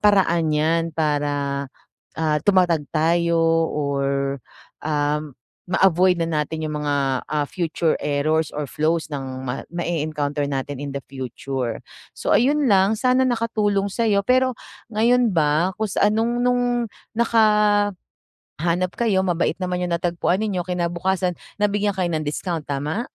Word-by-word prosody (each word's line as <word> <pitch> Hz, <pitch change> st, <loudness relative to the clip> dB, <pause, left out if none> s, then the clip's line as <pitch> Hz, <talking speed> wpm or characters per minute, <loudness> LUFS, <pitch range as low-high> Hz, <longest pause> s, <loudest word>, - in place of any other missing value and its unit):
paraan 195 Hz, -5 st, +3 dB
yan 160 Hz, +2 st, +2 dB
para, 145 Hz, -2 st, -1 dB, 0.5 s
ah, 155 Hz, -2 st, +1 dB
tumatag 175 Hz, -6 st, +3 dB
tayo 170 Hz, +1 st, +2 dB, 0.3 s
or, 140 Hz, -1 st, -1 dB, 0.4 s
ah, 150 Hz, -1 st, 0 dB, 0.5 s
ma-avoid 185 Hz, -1 st, +3 dB
na 165 Hz, -, 0 dB
natin 160 Hz, +2 st, -6 dB
yung 150 Hz, -1 st, -3 dB
mga, 140 Hz, -3 st, 0 dB
ah, 150 Hz, -1 st, -1 dB
future 165 Hz, -2 st, 0 dB
errors 150 Hz, +2 st, +1 dB
or 150 Hz, -1 st, -4 dB
flows 160 Hz, +3 st, 0 dB
ng 130 Hz, -2 st, -5 dB
ma 125 Hz, -, -4 dB
ma-e-counter 155 Hz, -4 st, -2 dB
natin 140 Hz, +1 st, -3 dB
in 140 Hz, -, -5 dB
the 140 Hz, -, -4 dB
future. 130 Hz, -1 st, -4 dB, 0.3 s
So -, -, -2 dB
ayun 285 Hz, +2 st, +2 dB
lang 200 Hz, +1 st, +3 dB
sana 255 Hz, 0 st, +3 dB
nakatulong 215 Hz, -5 st, 0 dB
sayo. 210 Hz, -2 st, +2 dB
Pero 255 Hz, 0 st, +3 dB, 0.4 s
ngayon 235 Hz, +1 st, +3 dB
ba 160 Hz, +3 st, +2 dB
kung 220 Hz, -1 st, -1 dB
sa 205 Hz, +1 st, +2 dB
anong 230 Hz, +2 st, 0 dB
nung 245 Hz, 0 st, +2 dB, 0.5 s
nakahanap 210 Hz, -4 st, +2 dB, 0.9 s
kayo 210 Hz, -5 st, +2 dB
mabait 175 Hz, -3 st, 0 dB
naman 180 Hz, 0 st, -1 dB
yung 175 Hz, -, -2 dB
natagpuan 175 Hz, +2 st, 0 dB
ninyo 190 Hz, -5 st, -1 dB
kinabukasan 180 Hz, +1 st, -1 dB, 0.3 s
nabigyan 205 Hz, 0 st, +1 dB
kayo 180 Hz, -2 st, 0 dB
ng 155 Hz, -1 st, -2 dB
discount, 160 Hz, +1 st, -3 dB
tama? 145 Hz, -, -2 dB
170 Hz, 130 wpm, -22 LUFS, 145-205 Hz, 0.9 s, paraan